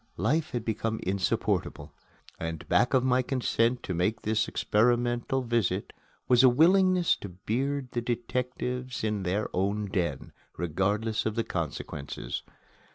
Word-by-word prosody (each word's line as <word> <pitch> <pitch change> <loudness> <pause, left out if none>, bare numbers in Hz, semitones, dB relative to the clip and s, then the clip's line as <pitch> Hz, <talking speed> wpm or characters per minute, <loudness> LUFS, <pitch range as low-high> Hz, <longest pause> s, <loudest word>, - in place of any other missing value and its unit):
Life 145 - +1
had 120 -2 -4
become 110 0 -1
insupportable; 90 -5 -1 0.5
and 80 -1 -5
back 125 - +3
of 130 - +4
my 130 0 +3
consent 125 -2 0
to 95 - -3
make 90 +6 0
this 110 0 +1
experimental 120 +3 +1
visit 110 -5 0 0.3
was 125 -1 +6
a 130 - +8
willingness 180 +6 +4
to 100 - -7
beard 130 +9 -2
the 120 - -1
detectives 125 +1 -3
in 105 -2 0
their 95 +3 -1
own 100 +3 0
den, 85 -8 -2 0.3
regardless 100 +7 0
of 110 - -3
consequences. 75 -3 -4
115 Hz, 130 wpm, -28 LUFS, 95-125 Hz, 0.5 s, a